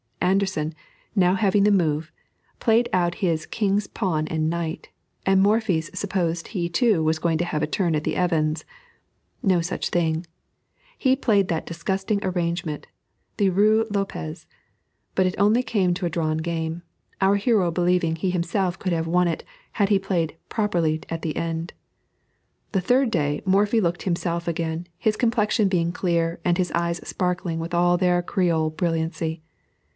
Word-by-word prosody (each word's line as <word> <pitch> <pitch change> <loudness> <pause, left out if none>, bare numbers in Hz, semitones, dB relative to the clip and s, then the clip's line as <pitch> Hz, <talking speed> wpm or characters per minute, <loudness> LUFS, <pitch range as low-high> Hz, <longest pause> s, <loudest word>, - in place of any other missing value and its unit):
Anderssen, 185 -4 +1 0.4
now 185 -2 +4
having 200 0 +3
the 210 - +5
move, 160 -4 +1 0.5
played 230 +1 +3
out 175 -1 +2
his 165 -6 0
king's 205 -2 0
pawn 160 -7 -1
and 160 -1 0
knight, 165 -1 -3 0.4
and 190 0 +4
Morphy 205 -4 +3
supposed 170 0 -2
he 175 -5 -2
too 190 -2 +2
was 155 0 +1
going 165 0 +1
to 175 - 0
have 155 -3 -2
a 155 - +1
turn 170 0 0
at 150 - -1
the - - -1
Evans'. 160 -3 0 0.8
No 185 -4 +3
such 170 +3 -3
thing; 165 -1 0 0.7
he 260 -1 +3
played 205 -8 +2
that 165 -2 -1
disgusting 190 +4 -2
arrangement, 170 -4 -2 0.5
the 200 -3 +3
Ruy 215 +4 +4
Lopez; 175 -5 -3 0.7
but 190 - +3
it 185 - -2
only 210 +4 +4
came 195 -8 +1
to 180 0 -3
a - - -2
drawn 155 -2 -1
game, 165 0 -3 0.4
our 195 +1 +4
hero 200 -3 +2
believing 175 -1 +1
he 180 +3 -1
himself 180 +1 -1
could 185 -2 -1
have 165 -1 0
won 180 +1 +3
it, 165 - -2 0.3
had 200 -2 +1
he 200 -2 +4
played 175 -5 -1
properly 170 -7 0
at 165 0 -4
the 155 - -2
end. 165 0 -3 1.0
The 195 - +1
third 250 +5 +2
day, 145 -4 0
Morphy 205 +4 +3
looked 175 -2 -1
himself 170 -1 -2
again, 165 0 -2
his 215 -2 0
complexion 225 -2 +2
being 170 -3 +1
clear, 170 -2 0
and 175 -1 +2
his 180 -2 0
eyes 170 0 -1
sparkling 180 -2 -1
with 165 +2 -5
all 175 +1 +3
their 180 -1 +2
Creole 170 -4 +1
brilliancy. 160 -1 -2
175 Hz, 160 wpm, -24 LUFS, 165-195 Hz, 1.0 s, the